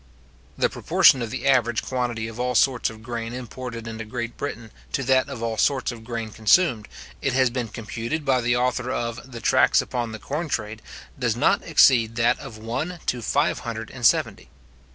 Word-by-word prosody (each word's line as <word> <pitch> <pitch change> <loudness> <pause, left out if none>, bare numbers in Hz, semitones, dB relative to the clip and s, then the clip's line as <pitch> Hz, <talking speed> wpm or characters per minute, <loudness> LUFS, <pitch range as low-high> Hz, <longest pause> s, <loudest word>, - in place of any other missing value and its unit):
The - - +3
proportion 130 - +4
of 115 - -3
the 135 - -5
average 120 -4 +2
quantity 120 -3 -2
of 115 +1 -9
all 125 0 -1
sorts 125 0 +3
of 110 -1 -12
grain 115 -1 -5
imported 125 -1 -7
into 110 0 -5
Great 115 +1 -5
Britain 115 -6 -6 0.2
to 135 - 0
that 130 +2 +2
of 125 -5 -6
all 115 -2 -2
sorts 135 +1 +2
of 115 -2 -10
grain 115 -1 -5
consumed, 110 - +3 0.3
it 135 - 0
has 130 -2 +3
been 125 -1 -2
computed 115 +7 -5
by 130 -2 +2
the 120 +1 +1
author 125 0 0
of 120 +1 -4
the 120 - -7
Tracts - - +4
upon 120 -2 -2
the 110 - -6
Corn 150 +8 -4
Trade, 110 -3 -3 0.4
does - - 0
not - - +2
exceed 115 -3 +4
that 115 0 +2
of 110 - -9
one 125 +11 -4
to 125 - -1
five - - +1
hundred - - -6
and - - -10
seventy. - - +2
120 Hz, 195 wpm, -24 LUFS, 115-130 Hz, 0.4 s, proportion